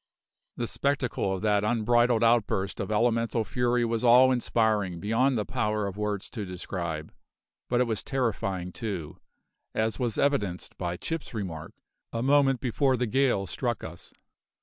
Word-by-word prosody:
The 120 - -1
spectacle 135 -6 -1
of 95 - -7
that 105 -1 +2
unbridled 120 +1 +3
outburst 110 -4 +2
of 100 - -3
elemental 115 +1 +1
fury 120 +1 +1
was 115 0 -1
awe 125 +2 +7
inspiring 110 -7 +1
beyond 115 +7 +2
the 105 - -1
power 105 -2 -1
of 100 -1 -4
words 105 -1 -2
to 110 - -4
describe, 85 -4 -5 0.6
but 120 - +2
it - - +5
was 110 -4 -2
terrifying 100 -9 -2
too, 90 -9 -5 0.6
as 110 -1 0
was 120 -4 -1
evidenced 105 -11 0
by 85 -1 -2
Chips' 160 - -5
remark, 80 -7 -5 0.4
a 115 0 -2
moment 135 -1 +4
before 130 +1 +1
the 125 - 0
gale 125 -4 +2
struck 85 - -3
us. - - -9
115 Hz, 150 wpm, -27 LUFS, 100-125 Hz, 0.6 s, awe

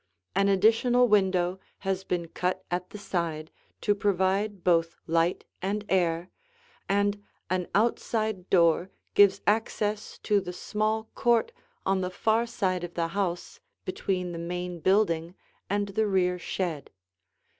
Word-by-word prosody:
An 195 +1 +3
additional 230 +5 +4
window 190 -3 +2 0.3
has 190 0 0
been 175 -3 -2
cut 185 +2 -2
at 180 +1 -2
the - - -8
side 170 -6 -3 0.3
to 205 - +3
provide 200 0 0
both 165 -2 +2
light 165 +1 +1 0.2
and 205 +3 -2
air, 175 -1 +1 0.6
and 205 +1 +1 0.3
an 185 -1 0
outside 215 -3 0
door 170 0 +4 0.2
gives 200 -1 +5
access 210 -1 0
to 205 -2 +3
the 180 -1 -6
small 215 +4 -1
court 240 - +2 0.3
on 195 -1 +2
the 180 - -1
far 225 +5 +1
side 185 -6 -1
of 175 0 -6
the 165 -1 0
house 180 -2 -3 0.3
between 185 -1 -2
the 170 - -5
main 175 +1 -4
building 170 -1 +2 0.3
and 205 +1 0
the 215 +2 +1
rear 180 -2 +1
shed. 170 -5 -3
190 Hz, 135 wpm, -28 LUFS, 175-205 Hz, 0.6 s, gives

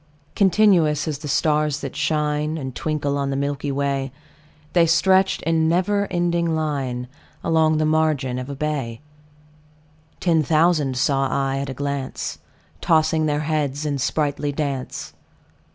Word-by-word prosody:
Continuous 180 -6 +3
as 150 -3 -3
the 150 - -7
stars 150 +1 +1
that 140 - -6
shine 150 0 0
And 130 -4 -5
twinkle 145 -1 -2
on 140 0 -1
the 135 - -1
milky 140 +1 -2
way, 135 -1 -1 0.6
The 170 -2 +4
stretched 190 +3 +3
in 160 0 +2
never 200 +4 +1
ending 170 -2 0
line 135 -6 -2 0.4
Along 160 -1 +3
the 155 - +1
margin 155 -5 +1
of 125 +2 -6
a 140 - -5
bay: 135 -6 -3 1.2
Ten 165 -3 +2
thousand 155 -3 +2
saw 135 +1 +2
I 135 0 0
at 140 0 -4
a 135 - -5
glance, 140 -1 -4 0.4
Tossing 155 -1 +2
their 150 0 0
heads 150 -2 -1
in 145 -2 -1
sprightly 145 +1 -1
dance. 140 -3 -4
150 Hz, 140 wpm, -22 LUFS, 140-160 Hz, 1.2 s, The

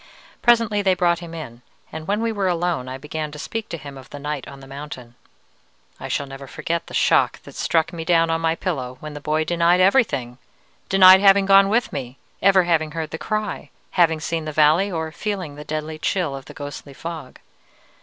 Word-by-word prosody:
Presently 230 -3 +3
they 190 -2 +2
brought 170 -1 +2
him 170 -1 -9
in, 125 -7 -8 0.3
and 160 0 -7
when 205 +2 0
we 230 0 0
were 200 -3 -1
alone 175 -6 -1
I 130 - -5
began 150 +2 -5
to - - -8
speak 225 +8 -5
to 165 - -4
him 140 -3 -10
of 130 - -15
the - - -8
night 145 -1 -4
on 140 -1 -10
the 135 - -12
mountain. 135 -3 -9 0.9
I - - -6
shall 140 - -1
never 135 0 -10
forget 170 +5 -3
the - - -7
shock - - +3
that - - -12
struck 165 +1 0
me 165 -1 -5
down 165 0 +3
on 165 0 0
my 165 0 +1
pillow 130 -9 -4
when 155 -1 -8
the 145 - -8
boy 155 +1 0
denied 170 +2 +2
everything: 185 - +2 0.5
denied 190 0 +8
having 195 0 +6
gone 195 0 +6
with 230 +3 +1
me, 130 -2 -5 0.2
ever 190 -1 +5
having 160 -3 0
heard 160 -2 -4
the 160 - -5
cry, 215 -1 -3 0.2
having 165 -3 +3
seen 160 0 -3
the 155 - -3
valley, 155 +6 +3
or 160 -2 -3
feeling 190 -4 -4
the 150 +1 -9
deadly 155 +1 -5
chill 165 -5 -1
of 135 -1 -9
the - - -12
ghostly 145 -1 -8
fog. 160 -5 -7
160 Hz, 210 wpm, -22 LUFS, 145-185 Hz, 0.9 s, denied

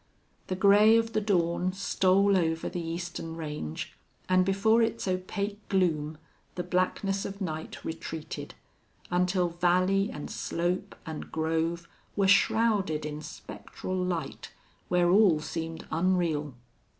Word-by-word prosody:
The 185 - -2
gray 205 +3 +6
of 225 0 0
the 215 - +1
dawn 180 -2 +1
stole 195 +1 +3
over 165 -3 0
the 175 - -4
eastern 165 0 -5
range, 150 - -5 0.3
and 185 0 +4
before 200 +4 +3
its 225 -2 0
opaque 200 +3 -2
gloom 160 -5 +1 0.4
the 180 - -2
blackness 190 +2 0
of 200 0 -6
night 160 -5 -5
retreated, 160 -1 -6 0.6
until 180 0 +2
valley 185 +3 +2
and 150 - -7
slope 180 +3 -2
and 160 -1 -7
grove 165 +1 -1 0.3
were 200 -1 +2
shrouded 200 -6 +3
in 150 0 -5
spectral 160 +4 -7
light, 180 -5 -3 0.4
where 175 -1 +3
all 190 -5 +5
seemed 160 +1 -5
unreal. 165 -5 0
180 Hz, 125 wpm, -28 LUFS, 160-195 Hz, 0.6 s, gray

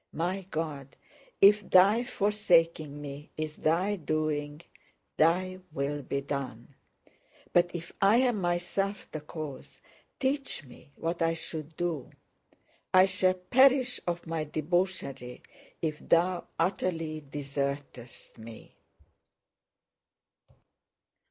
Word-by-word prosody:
My 180 +3 -2
God, 150 -5 -4 0.5
if 205 +1 +8
Thy 200 +6 +6
forsaking 170 -9 +2
me 145 0 -8
is 155 -1 -3
Thy 180 +6 +1
doing, 155 -2 -2 0.6
Thy 185 +4 +2
will 145 0 -2
be 140 +1 -2
done; 135 -3 -5 0.8
but 175 0 +5
if 170 0 -6
I 200 +3 +6
am 245 -5 +2
myself 175 +3 -1
the 155 - -5
cause, 150 -2 -8 0.4
teach 270 - -1
me 130 +4 -16
what 170 +1 -3
I 165 0 +3
should 160 -1 -7
do! 170 -6 -2 0.8
I 185 0 +7
shall 185 -1 +2
perish 255 +6 +4
of 175 0 -2
my 165 -1 -2
debauchery 155 -5 -2 0.4
if 155 -2 -1
Thou 175 +1 +2
utterly 165 -3 -1
desertest 140 -4 -5
me! 110 0 -11
165 Hz, 105 wpm, -29 LUFS, 145-185 Hz, 0.8 s, if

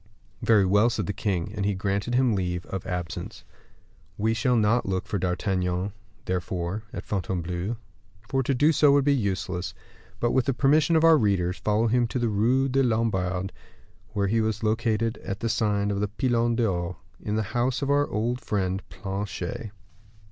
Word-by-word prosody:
"Very 105 -4 +4
well," 105 +5 +4
said 120 - -2
the 105 - -2
king, 100 -2 -2
and 105 -3 -3
he 100 0 +1
granted 100 +5 -1
him 125 -2 +3
leave 90 -3 -2
of 95 -2 -5
absence. 90 -2 -5 0.7
We 110 +2 +1
shall 120 +2 +1
not 115 +1 +2
look 95 -1 -1
for 100 - -2
D'Artagnan, 90 +1 -1 0.3
therefore, 90 +2 -2
at - - -6
Fontainebleau, 90 +2 -2 0.5
for 135 +1 +1
to 135 +1 0
do 150 +5 +4
so 150 -2 +5
would 140 -1 +3
be 145 - +4
useless; 95 -5 -2 0.4
but, 120 - +1
with 130 -2 +2
the 135 - 0
permission 150 +5 +3
of 160 - +4
our 165 -2 +7
readers, 95 -4 +1
follow 105 +2 +1
him 120 +1 +2
to 125 - -3
the 120 -2 +1
Rue 120 +6 +2
des 135 +1 +2
Lombards, 95 -6 0 0.6
where 100 -1 +1
he 110 +3 +2
was 110 0 -1
located 110 0 0
at 100 +1 -5
the 115 - -1
sign 105 -2 +1
of 100 - -1
the 105 - 0
Pilon 120 +1 +1
d'Or, 90 -6 0 0.3
in 105 - -2
the 110 - +1
house 125 +2 0
of 140 - 0
our 145 0 +2
old 120 +4 -1
friend 95 -2 -1
Planchet. 100 +1 -4
105 Hz, 180 wpm, -26 LUFS, 95-120 Hz, 0.7 s, our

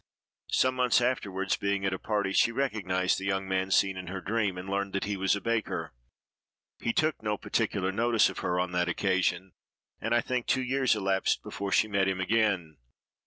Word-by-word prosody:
Some 130 0 +3
months 125 -1 +4
afterward, 100 -6 0
being 100 -1 -1
at 95 - +1
a 95 - -4
party, 100 -3 -1
she 115 - +4
recognized 95 -9 0
the 95 - -6
young 95 -1 -1
man 95 0 0
seen 95 0 +2
in 90 -1 -7
her 95 +1 -4
dream, 100 -2 -1
and 90 +1 -7
learned 100 0 -2
that 100 - -1
he 100 0 -2
was 95 +1 +1
a 100 - -5
baker. 115 - -2 0.9
He 115 - 0
took 155 +4 0
no 105 -1 -1
particular 100 -4 -1
notice 115 +2 +3
of 95 - -6
her 90 0 -1
on 90 0 -1
that 90 0 0
occasion; 95 0 0 0.5
and, 115 +1 0
I 120 - +4
think, 125 0 -2
two 130 -1 +1
years 130 -1 +2
elapsed 95 -2 0
before 100 0 -5
she 110 - +3
met 100 -2 +1
him 95 -1 -1
again. 95 -6 0
100 Hz, 200 wpm, -29 LUFS, 95-115 Hz, 0.9 s, months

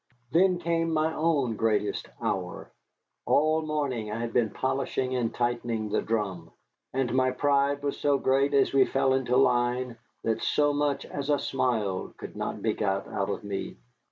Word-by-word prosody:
Then 180 +2 +4
came 165 -1 0
my 160 0 +1
own 150 -8 +1
greatest 105 -2 0
hour. 90 -2 -3 0.6
All 155 +2 +3
morning 140 -8 -2
I 110 - -3
had 115 -1 -3
been 115 -3 +2
polishing 130 +1 -1
and 120 -2 0
tightening 120 -3 -1
the 105 - +1
drum, 95 -7 -2 0.4
and 130 -2 -1
my 130 0 +3
pride 140 +1 +1
was 140 - -2
so 145 -1 +3
great 135 +2 +2
as 135 -1 +3
we 135 -1 +6
fell 135 0 +1
into 130 -1 +1
line 125 -1 +2 0.3
that 110 -1 0
so 145 -1 +2
much 145 -1 0
as 140 0 -5
a 145 - +4
smile 110 -9 -1
could - - -9
not - - -4
be - - +2
got 100 -2 -1
out 95 - -2
of 100 - -3
me. 100 -1 -5
130 Hz, 170 wpm, -28 LUFS, 115-145 Hz, 0.6 s, we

